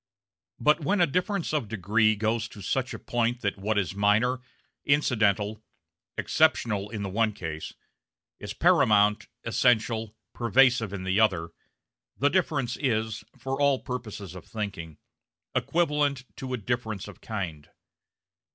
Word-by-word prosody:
But 150 Hz, +7 st, +4 dB
when 185 Hz, +7 st, 0 dB
a 175 Hz, -, +6 dB
difference 180 Hz, +3 st, -1 dB
of 145 Hz, -8 st, 0 dB
degree 110 Hz, +1 st, +2 dB
goes 110 Hz, +2 st, 0 dB
to 100 Hz, -3 st, -11 dB
such 130 Hz, +6 st, -1 dB
a -, -, -5 dB
point 120 Hz, 0 st, -1 dB
that 100 Hz, -1 st, -2 dB
what 105 Hz, +2 st, -1 dB
is 95 Hz, -3 st, 0 dB
minor, 105 Hz, +6 st, +2 dB, 0.4 s
incidental, 110 Hz, -7 st, +2 dB, 0.6 s
exceptional 110 Hz, -10 st, +2 dB
in 105 Hz, -2 st, -5 dB
the 100 Hz, -, -3 dB
one 110 Hz, +2 st, +1 dB
case, 80 Hz, -6 st, -6 dB, 0.6 s
is -, -, -6 dB
paramount, 105 Hz, 0 st, +4 dB, 0.2 s
essential, 115 Hz, -2 st, +1 dB, 0.2 s
pervasive 120 Hz, -2 st, +3 dB
in 100 Hz, -2 st, -5 dB
the 95 Hz, +2 st, +1 dB
other, 90 Hz, -7 st, +2 dB, 0.7 s
the 145 Hz, -, +3 dB
difference 145 Hz, -10 st, 0 dB
is, 110 Hz, -4 st, -1 dB
for 135 Hz, +2 st, -3 dB
all 140 Hz, -1 st, +4 dB
the -, -, -17 dB
purposes 110 Hz, -7 st, -6 dB
of 95 Hz, -, -9 dB
thinking, 95 Hz, -8 st, -5 dB, 0.6 s
equivalent 150 Hz, -5 st, +1 dB
to 130 Hz, -1 st, -6 dB
a 125 Hz, -, 0 dB
difference 110 Hz, -3 st, -3 dB
of 105 Hz, -, -12 dB
kind. 85 Hz, -9 st, -5 dB
110 Hz, 140 wpm, -27 LUFS, 100-130 Hz, 0.7 s, a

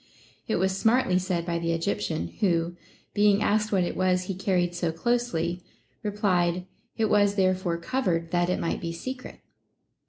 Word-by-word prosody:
It 220 Hz, -, +1 dB
was 190 Hz, +1 st, +1 dB
smartly 220 Hz, -3 st, +3 dB
said 180 Hz, -2 st, -2 dB
by 170 Hz, -1 st, -1 dB
the 165 Hz, 0 st, 0 dB
Egyptian, 105 Hz, -, -1 dB
who, 170 Hz, -3 st, +1 dB, 0.4 s
being 205 Hz, 0 st, +4 dB
asked 215 Hz, +1 st, +1 dB
what 190 Hz, -3 st, +3 dB
it 175 Hz, -, -3 dB
was 185 Hz, -1 st, +2 dB
he 195 Hz, -, -3 dB
carried 180 Hz, -2 st, 0 dB
so 175 Hz, -1 st, -1 dB
closely, 180 Hz, -3 st, -1 dB, 0.4 s
replied, 185 Hz, -4 st, +1 dB, 0.3 s
it 225 Hz, -, +2 dB
was 205 Hz, -1 st, +3 dB
therefore 185 Hz, -3 st, +1 dB
cov 255 Hz, +9 st, -2 dB
ered 165 Hz, -2 st, 0 dB
that 175 Hz, 0 st, +2 dB
it 180 Hz, -, 0 dB
might 165 Hz, -, -2 dB
be 170 Hz, -1 st, -3 dB
secret. 255 Hz, +9 st, -7 dB
185 Hz, 165 wpm, -27 LUFS, 170-205 Hz, 0.4 s, being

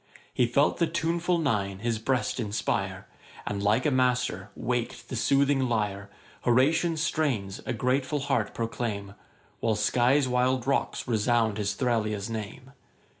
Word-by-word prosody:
He 125 Hz, -, +2 dB
felt 140 Hz, +5 st, +2 dB
the 170 Hz, -, +3 dB
tuneful 170 Hz, +2 st, 0 dB
Nine 105 Hz, -, 0 dB
his 115 Hz, +1 st, -2 dB
breast 125 Hz, +3 st, -1 dB
inspire, 105 Hz, -2 st, -2 dB, 0.4 s
And, 100 Hz, -1 st, -3 dB
like 105 Hz, +5 st, +2 dB
a 150 Hz, -, +3 dB
master, 125 Hz, -7 st, +1 dB
wak'd 120 Hz, -1 st, -3 dB
the -, -, -4 dB
soothing 135 Hz, +2 st, +2 dB
lyre: 100 Hz, -3 st, -1 dB, 0.3 s
Horatian 155 Hz, +7 st, +3 dB
strains 135 Hz, -12 st, -1 dB
a 130 Hz, -, 0 dB
grateful 130 Hz, +4 st, 0 dB
heart 135 Hz, -6 st, -1 dB
proclaim, 110 Hz, -4 st, -3 dB, 0.5 s
While 110 Hz, -2 st, +1 dB
Sky's 125 Hz, +6 st, +3 dB
wild 125 Hz, 0 st, +1 dB
rocks 140 Hz, 0 st, -1 dB
resound 110 Hz, -1 st, +1 dB
his 105 Hz, -1 st, -1 dB
Thralia's 110 Hz, -4 st, -1 dB
name. 110 Hz, +4 st, -6 dB
120 Hz, 135 wpm, -27 LUFS, 105-135 Hz, 0.5 s, the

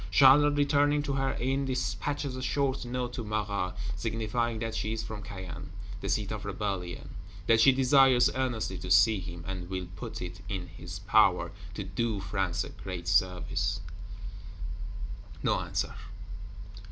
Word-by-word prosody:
Charlotte, 145 Hz, +6 st, +7 dB
returning 145 Hz, 0 st, +3 dB
to 140 Hz, -, -2 dB
her 135 Hz, 0 st, 0 dB
Inn, 135 Hz, +3 st, 0 dB
dispatches 130 Hz, +3 st, -2 dB
a 130 Hz, -, -5 dB
short 135 Hz, +1 st, 0 dB
Note 125 Hz, 0 st, -3 dB
to 125 Hz, -, -4 dB
Marat; 105 Hz, -3 st, -1 dB, 0.2 s
signifying 115 Hz, +3 st, -1 dB
that 115 Hz, 0 st, -3 dB
she 110 Hz, 0 st, -1 dB
is 110 Hz, -1 st, -3 dB
from 110 Hz, -1 st, -6 dB
Caen, 95 Hz, -7 st, -7 dB, 0.3 s
the 100 Hz, -, -4 dB
seat 100 Hz, +4 st, 0 dB
of 105 Hz, -2 st, -4 dB
rebellion; 95 Hz, -3 st, -3 dB, 0.3 s
that 110 Hz, +2 st, +5 dB
she 135 Hz, -, +8 dB
desires 130 Hz, -1 st, +6 dB
earnestly 110 Hz, -7 st, -1 dB
to 90 Hz, -, -6 dB
see 100 Hz, +4 st, +6 dB
him, 85 Hz, -2 st, -7 dB
and 90 Hz, -2 st, -5 dB
"will 95 Hz, -1 st, -3 dB
put 90 Hz, -, -6 dB
it 90 Hz, +2 st, -6 dB
in 95 Hz, -3 st, -3 dB
his 85 Hz, +2 st, -8 dB
power 95 Hz, -3 st, +3 dB, 0.2 s
to 105 Hz, -, -3 dB
do 105 Hz, +3 st, -1 dB
France 95 Hz, -2 st, -1 dB
a -, -, -7 dB
great 90 Hz, -3 st, -7 dB
service." 90 Hz, +2 st, +1 dB, 1.6 s
No -, -, +2 dB
answer. -, -, -2 dB
105 Hz, 155 wpm, -30 LUFS, 95-125 Hz, 1.6 s, she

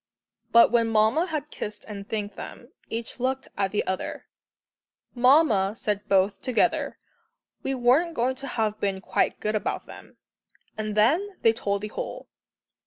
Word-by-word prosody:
But 235 Hz, 0 st, +7 dB
when 235 Hz, -1 st, +3 dB
Mamma 225 Hz, +10 st, +3 dB
had 305 Hz, -3 st, -4 dB
kissed 210 Hz, 0 st, -6 dB
and 200 Hz, -1 st, -8 dB
thanked 210 Hz, -2 st, -3 dB
them, 240 Hz, -, -9 dB, 0.2 s
each 230 Hz, +2 st, -5 dB
looked 260 Hz, +2 st, -1 dB
at 195 Hz, -1 st, 0 dB
the 210 Hz, -, 0 dB
other. 190 Hz, 0 st, -4 dB, 0.9 s
"Mamma," 245 Hz, -6 st, +4 dB
said 205 Hz, -3 st, -3 dB
both 195 Hz, +1 st, +2 dB
together, 255 Hz, -3 st, +1 dB, 0.6 s
"we 270 Hz, -, -2 dB
weren't 265 Hz, +8 st, +3 dB
going 250 Hz, +1 st, +1 dB
to 275 Hz, +1 st, -6 dB
have 215 Hz, -4 st, -1 dB
been 195 Hz, -1 st, -1 dB
quite -, -, 0 dB
good 215 Hz, -, -1 dB
about 215 Hz, -, -2 dB
them," -, -, -13 dB, 0.6 s
and 215 Hz, -1 st, -4 dB
then 345 Hz, -, +2 dB
they 225 Hz, -, +5 dB
told 200 Hz, -3 st, -2 dB
the 210 Hz, -, -3 dB
whole. -, -, -6 dB
225 Hz, 155 wpm, -26 LUFS, 205-260 Hz, 0.9 s, But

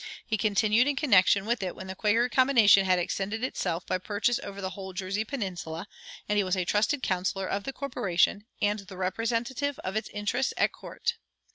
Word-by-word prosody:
He 220 Hz, -, 0 dB
continued 215 Hz, +3 st, +3 dB
in 290 Hz, -, +1 dB
connection 200 Hz, -7 st, +4 dB
with 235 Hz, 0 st, 0 dB
it 185 Hz, -2 st, -3 dB
when 190 Hz, -, -8 dB
the 190 Hz, -, -5 dB
Quaker 225 Hz, +5 st, +2 dB
combination 235 Hz, -7 st, +5 dB
had 185 Hz, -1 st, +3 dB
extended 200 Hz, +5 st, -2 dB
itself 180 Hz, -9 st, -2 dB
by 185 Hz, -, -1 dB
purchase 210 Hz, +5 st, 0 dB
over 200 Hz, 0 st, -8 dB
the 190 Hz, -1 st, -3 dB
whole 190 Hz, -2 st, -8 dB
Jersey 195 Hz, +3 st, -2 dB
peninsula, 185 Hz, -, -5 dB, 0.4 s
and 210 Hz, -, +1 dB
he -, -, +3 dB
was 185 Hz, 0 st, 0 dB
a 180 Hz, -, 0 dB
trusted 220 Hz, +9 st, +1 dB
counselor 190 Hz, +1 st, -1 dB
of 200 Hz, +1 st, -3 dB
the -, -, -3 dB
corporation, 205 Hz, -6 st, 0 dB, 0.2 s
and 205 Hz, +1 st, +2 dB
the 195 Hz, -1 st, -11 dB
representative 230 Hz, +8 st, -1 dB
of 185 Hz, -, -4 dB
its 220 Hz, -, -2 dB
interests 210 Hz, +6 st, -1 dB
at -, -, +3 dB
court. 470 Hz, 0 st, -4 dB
205 Hz, 190 wpm, -28 LUFS, 190-235 Hz, 0.4 s, combination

